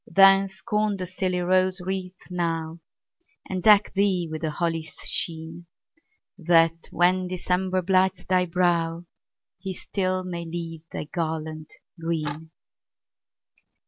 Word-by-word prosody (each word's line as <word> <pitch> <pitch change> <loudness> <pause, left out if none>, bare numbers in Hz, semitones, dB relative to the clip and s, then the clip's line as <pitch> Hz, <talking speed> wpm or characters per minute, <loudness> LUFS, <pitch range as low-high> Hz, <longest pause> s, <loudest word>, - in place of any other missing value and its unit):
Then, 195 0 +6
scorn 210 +1 -1
the 185 - -3
silly 185 0 -1
rose 185 +1 +2
wreath 185 0 -6
now, 165 -2 -2 0.7
And 185 -1 -3
deck 210 +1 +6
thee 190 -3 +1
with 155 - -5
the 160 - -1
holly's 165 0 -2
sheen, 165 +1 -2 0.7
That, 165 -1 +3
when 180 +1 +2
December 185 +1 -1
blights 190 +1 +2
thy 180 -1 +2
brow, 170 -1 0 0.5
He 190 0 -5
still 185 -1 -2
may 175 -2 -5
leave 165 -1 -6
thy - - -4
garland 155 -1 -4 0.3
green. 160 -1 -3
180 Hz, 115 wpm, -25 LUFS, 165-185 Hz, 0.7 s, Then